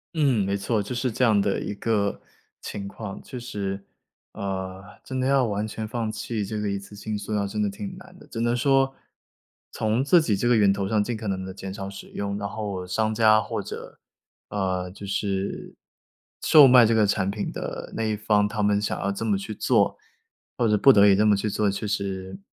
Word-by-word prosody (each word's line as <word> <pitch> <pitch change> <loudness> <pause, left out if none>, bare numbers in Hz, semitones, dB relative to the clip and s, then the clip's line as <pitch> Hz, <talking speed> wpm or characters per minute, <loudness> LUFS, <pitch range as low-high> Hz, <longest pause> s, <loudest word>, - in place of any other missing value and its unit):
嗯， 135 -10 +2
没 100 0 0
错， 105 +2 0
就 115 +5 -5
是 125 0 -1
这 125 - -1
样 110 -4 +4
的 100 0 +1
一 105 - -4
个 100 -1 -1 0.4
情 100 -1 -6
况。 100 -1 -7
确 125 - -9
实， 100 -5 -4 0.5
呃， 95 -1 -4 0.2
真 130 -1 -4
的 130 - +1
要 135 -2 +3
完 105 0 -2
全 110 0 -5
放 115 -1 -2
弃 110 -1 -3
这 110 +1 -4
个 105 -1 -1
一 100 - -2
次 100 +1 -12
性 105 +1 -4
塑 105 +1 -5
料 100 -1 +1
真 105 +2 -3
的 105 - +1
挺 185 - -7
难 185 0 -14
的， - - -15
只 115 - -6
能 120 +1 +1
说 135 +1 +2 0.8
从 110 +4 0
自 170 +4 +5
己 110 -9 +1
这 120 - 0
个 120 - +5
源 100 -2 +5
头 100 -1 -1
上 105 0 +2
尽 115 +1 -3
可 110 -1 -6
能 95 -1 -2
地 95 - -7
减 95 0 -7
少 100 -1 -6
使 100 0 -10
用， 100 0 -4
然 100 -1 -3
后 100 -3 -5
商 110 +3 0
家 110 -1 +5
或 - - -3
者， - - -9 0.5
呃， 95 -2 -2
就 100 +2 -10
是 100 0 -3 0.7
售 150 -3 +8
卖 125 -2 +8
这 115 +1 +2
个 110 -2 +4
产 100 -1 +1
品 100 0 -3
的 - - -6
那 115 - -1
一 110 -1 0
方， 105 -1 +2
他 105 0 -2
们 105 0 +2
想 - - -2
要 100 - 0
这 100 +3 -4
么 105 -3 +2
去 100 +2 -6
做， - - +2 0.6
或 120 - +2
者 105 - +4
不 135 +5 +7
得 100 0 +6
已 100 - +6
这 105 - +3
么 105 - +5
去 105 +2 -1
做， 105 0 +1
确 100 +2 -3
实， 100 - -3
105 Hz, 240 characters per minute, -25 LUFS, 100-115 Hz, 0.8 s, 售